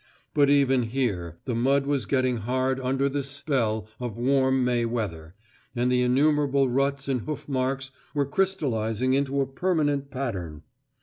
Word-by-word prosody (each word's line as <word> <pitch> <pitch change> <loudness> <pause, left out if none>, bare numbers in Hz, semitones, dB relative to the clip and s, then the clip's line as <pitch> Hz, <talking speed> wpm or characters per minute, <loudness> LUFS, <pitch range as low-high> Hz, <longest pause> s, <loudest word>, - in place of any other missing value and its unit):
But 145 -1 +4
even 135 -2 +4
here 95 - -2
the 125 - -2
mud 135 +4 +2
was 140 -2 -1
getting 130 -2 +1
hard 130 +4 -1
under 135 +1 0
this 140 0 -2
spell 130 -7 -1
of 120 -3 -5
warm 130 +1 +2
May 120 -1 +1
weather, 95 -8 -4 0.4
and 125 +1 +1
the 125 0 +3
innumerable 140 +1 +3
ruts 140 +2 0
and 130 -3 0
hoof 150 +4 -6
marks 135 0 -1 0.2
were 145 -1 +2
crystallising 130 - 0
into 140 0 +1
a - - +1
permanent 145 -1 0
pattern. 95 - -4
130 Hz, 150 wpm, -26 LUFS, 120-140 Hz, 0.4 s, But